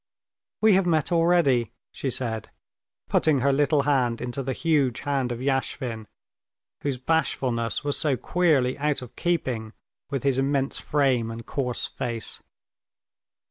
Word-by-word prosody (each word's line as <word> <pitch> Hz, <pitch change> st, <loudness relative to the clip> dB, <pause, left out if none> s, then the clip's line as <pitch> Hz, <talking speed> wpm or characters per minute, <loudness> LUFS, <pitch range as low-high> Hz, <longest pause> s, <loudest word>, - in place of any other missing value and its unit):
"We 220 Hz, -1 st, +6 dB
have 190 Hz, -1 st, +3 dB
met 160 Hz, 0 st, +1 dB
already," 165 Hz, -9 st, +3 dB, 0.2 s
she 135 Hz, -, -3 dB
said, 115 Hz, -4 st, -3 dB, 0.6 s
putting 150 Hz, -5 st, +2 dB
her 140 Hz, +2 st, +3 dB
little 145 Hz, +1 st, +3 dB
hand 130 Hz, -5 st, +1 dB
into 125 Hz, +2 st, -3 dB
the 135 Hz, 0 st, -3 dB
huge 145 Hz, -5 st, +1 dB
hand 135 Hz, -3 st, -1 dB
of 120 Hz, -, -3 dB
Yashvin, 130 Hz, -4 st, -2 dB, 0.7 s
whose 140 Hz, -3 st, -1 dB
bashfulness 125 Hz, -5 st, 0 dB
was 145 Hz, -1 st, 0 dB
so 145 Hz, -4 st, +1 dB
queerly 150 Hz, -8 st, +1 dB
out 145 Hz, -2 st, 0 dB
of 125 Hz, -, -12 dB
keeping 125 Hz, -10 st, -1 dB, 0.4 s
with 140 Hz, -3 st, -3 dB
his 135 Hz, -2 st, +2 dB
immense 135 Hz, 0 st, 0 dB
frame 130 Hz, -6 st, +1 dB
and 115 Hz, 0 st, -7 dB
coarse 125 Hz, -3 st, -2 dB
face. 120 Hz, -4 st, -4 dB
135 Hz, 140 wpm, -25 LUFS, 125-145 Hz, 0.7 s, We